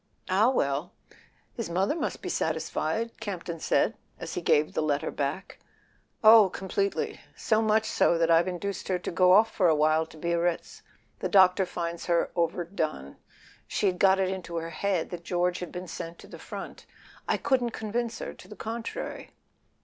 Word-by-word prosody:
"Ah, 210 +6 +4
well—his 170 - -4
mother 190 +8 +1
must 335 - -3
be - - -4
satisfied,'' 230 +1 -2
Camp 200 -6 -5
ton 170 -2 -5
said 220 - +1 0.2
as 165 - -6
he 180 - -3
gave 150 -2 +2
the - - 0
letter 150 0 0
back. 145 +8 -4 0.6
"Oh, 215 -2 +8
completely. 195 +2 -2 0.2
So 220 0 +1
much 220 0 +2
so 170 - +2
that 165 0 +2
I've 165 +2 +5
induced 190 +2 -4
her 185 - +1
to 180 - -5
go 180 +1 +5
off 220 +3 +5
for 185 - +3
a 160 - +4
while 155 +1 +2
to 160 - -15
Biarritz. 170 +1 -1 0.4
The - - -2
doctor 190 -1 +5
finds 170 -1 -4
her 170 -1 +1
overdone; 165 - -2 0.5
she'd 185 -3 0
got 195 0 +5
it 190 -1 +1
into 180 -3 -5
her 165 0 -3
head 190 -2 -1
that 175 -1 -6
George 180 0 0
had 180 - -6
been 180 +1 -6
sent 170 0 -7
to - - -14
the - - -11
front; - - -8 0.4
I - - +2
couldn't 260 -4 +1
convince 230 +1 -3
her - - -6
to - - -15
the - - -10
contrary." 230 +1 -5
180 Hz, 175 wpm, -28 LUFS, 170-205 Hz, 0.6 s, Oh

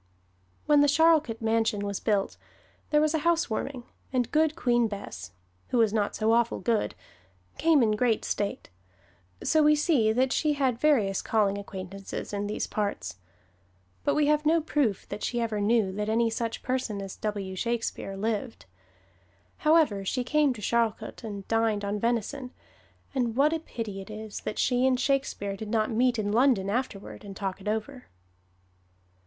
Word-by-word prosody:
When 295 -1 +5
the 290 - +5
Charlcote 300 -6 +3
Mansion 220 -2 +1
was 200 -1 -3
built, 205 -3 0 0.5
there 300 - +4
was 305 +1 +2
a 320 - +1
housewarming, 290 -6 0 0.3
and 250 -3 0
Good 310 0 +2
Queen 240 -6 +2
Bess 90 - -7 0.4
(who - - -1
was 225 -3 +3
not 210 -2 0
so 220 +1 +1
awful 235 0 +2
good) 230 -3 0 0.6
came 315 -4 +4
in 215 - +3
great 225 +1 +1
state; 200 - -3 0.7
so 315 - +3
we 300 0 +5
see 290 -8 +3
that 255 +3 +2
she 305 -1 +2
had 265 -5 0
various 225 -11 +2
calling 205 -3 +1
acquaintances 195 0 -7
in 205 0 -2
these 210 - -2
parts. 200 - -3 0.9
But - - +1
we 300 - +3
have 300 0 +2
no 320 +2 +4
proof 290 - 0
that 205 +1 -6
she 240 - -1
ever 220 -3 -1
knew 210 -2 +2
that 210 +2 -3
any 230 +1 +2
such 230 0 -3
person 250 -5 -2
as 195 -1 -6
W. 200 -3 -3
Shakespeare 230 -2 -2
lived. 225 +3 -3 0.9
However, 305 -11 +3
she 250 +6 -1
came 295 +2 +2
to 220 - -10
Charlcote 230 +2 -1
and 200 -3 -6
dined 225 -2 +1
on 205 +1 -2
venison, 240 +4 -1 0.6
and 240 -4 0
what 290 +4 +4
a 325 - 0
pity 220 -10 -6
it 190 - -11
is 215 0 -7
that - - -5
she 250 +1 +2
and 255 -1 +2
Shakespeare 255 -7 -1
did 210 +1 -7
not 220 0 +1
meet 245 +2 +2
in 205 -1 -1
London 225 -4 +3
afterward 225 -5 -4
and 195 -2 -9
talk 195 -1 -4
it 190 - -9
over! 220 +5 -3
225 Hz, 170 wpm, -27 LUFS, 205-265 Hz, 0.9 s, When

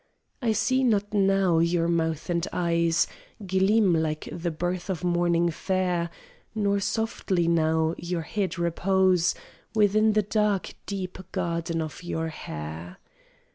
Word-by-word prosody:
I 230 -3 +2
see 260 +4 +1
not 210 -4 +1
now 195 -4 +3
your 170 0 +2
mouth 165 -2 0
and 170 0 0
eyes 170 -1 +2 0.4
Gleam, 190 +1 +3
like 155 -1 -1
the 175 0 -3
birth 175 +3 -3
of 180 -2 -3
morning 175 -1 +2
fair, 180 0 -1 0.5
Nor 200 -2 +1
softly 200 -4 -1
now 160 -1 +2
your 170 -1 -3
head 185 +1 -2
repose 180 +1 +2 0.4
Within 215 +1 +4
the 215 0 +3
dark 210 -1 0
deep 190 -2 -4
garden 170 -2 -1
of 155 - -7
your 165 -2 -3
hair. 80 - -7
175 Hz, 130 wpm, -26 LUFS, 165-195 Hz, 0.5 s, Within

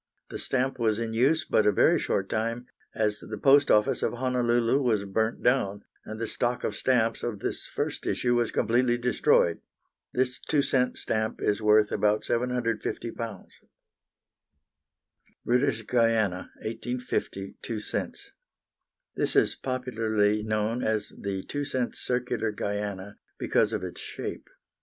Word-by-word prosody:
The - - -5
stamp 130 0 -1
was 110 -2 +2
in 115 -1 -3
use 140 +7 +2
but 110 - +2
a - - +6
very - - +4
short 95 - -1
time, 115 +3 -2 0.3
as 105 -1 +2
the 110 - -7
Post 140 +5 +5
Office 105 0 +3
of - - 0
Honolulu 120 0 +1
was 110 -6 +1
burnt 110 +3 -1
down, 100 -6 +1 0.2
and 110 0 -7
the 115 - -1
stock 120 +2 -1
of 105 - -2
stamps 115 -3 +1
of 120 -3 -3
this - - -4
first - - -3
issue 120 -1 +1
was 120 -2 +2
completely 120 +1 +2
destroyed. 120 -8 +2 0.5
This 125 0 0
2 145 -3 +1
cents 130 -2 +1
stamp 110 0 -1
is 105 +1 0
worth 105 0 +4
about 105 0 +2
£750. 115 -3 -2 2.0
British 125 -2 +1
Guiana, 115 -6 +1
1850, 115 -4 -4
2 115 -2 -4
cents. 105 - -5 0.8
This - - 0
is - - +4
popularly 110 -5 0
known 110 +2 -1
as 110 -1 0
the 95 -1 -5
2 145 0 -3
cents 130 -3 -2
circular 125 -3 -1
Guiana, 100 -1 -4 0.2
because 105 - +1
of 105 -4 -3
its 90 - -6
shape. - - -6
115 Hz, 140 wpm, -27 LUFS, 105-125 Hz, 2.0 s, a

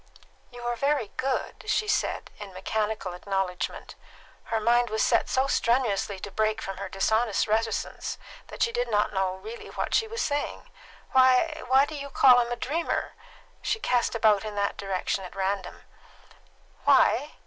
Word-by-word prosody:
"You 245 0 -11
are 240 0 -1
very 275 -3 0
good," 260 0 -3
she 425 - +1
said, - - -1
in 200 -2 -9
mechanical 210 -1 -2
acknowledgment: 190 0 -3 0.5
her 225 0 -1
mind 240 +2 +3
was 220 0 0
set - - +2
so 260 +1 +2
strenuously 235 -6 +1
to 205 - -6
break 215 +1 0
from 195 -3 -6
her - - -5
dishonest 220 +3 +1
reticence 225 +1 -1 0.3
that - - -2
she 465 - +1
did - - -1
not 205 0 +1
know 190 -1 0
really 215 +5 -9
what - - -4
she 445 - +3
was 455 +1 -2
saying. 290 0 -3 0.4
"Why 260 +4 +4
why 265 +2 +5
do 310 - -9
you 280 -1 -6
call 255 -2 +6
him 240 0 0
a - - 0
dreamer?" 305 +8 -2 0.5
She 440 - -1
cast 245 - +1
about 215 -3 +3
in 215 -1 -6
that 200 0 0
direction 195 0 -2
at 180 - -10
random. 195 -1 -3 1.0
"Why? - - +4
225 Hz, 165 wpm, -27 LUFS, 200-260 Hz, 1.0 s, call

